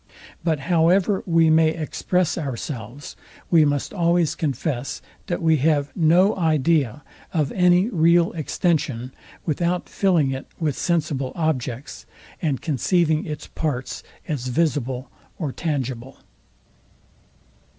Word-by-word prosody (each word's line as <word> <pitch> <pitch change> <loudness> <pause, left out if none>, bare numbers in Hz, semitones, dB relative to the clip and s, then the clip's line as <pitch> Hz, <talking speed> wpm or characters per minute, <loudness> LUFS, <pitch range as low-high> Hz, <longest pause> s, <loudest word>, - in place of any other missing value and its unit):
But 160 -4 0
however 180 +5 +3
we 165 -2 +4
may 160 0 +5
express 170 +2 -1
ourselves, 135 -3 -6 0.4
we 165 -3 +6
must 145 -1 -1
always 170 -1 +2
confess, 140 -3 -3 0.3
that 175 -1 -2
we 160 -1 +4
have 145 0 +1
no 175 +4 +4
idea 155 - +1 0.3
of 150 -5 0
any 180 +1 +4
real 170 -4 +3
extension 145 -6 -1 0.3
without 170 +3 -1
filling 170 -9 +2
it 130 0 -5
with 155 -5 0
sensible 150 -6 -1
objects, 135 -6 -3 0.3
and 145 -6 -1
conceiving 160 +1 +1
its 150 -1 -5
parts 135 -5 -3 0.3
as 140 -7 -3
visible 130 -3 -1 0.3
or 150 -6 -3
tangible. 135 -5 -4
155 Hz, 110 wpm, -23 LUFS, 135-170 Hz, 0.4 s, we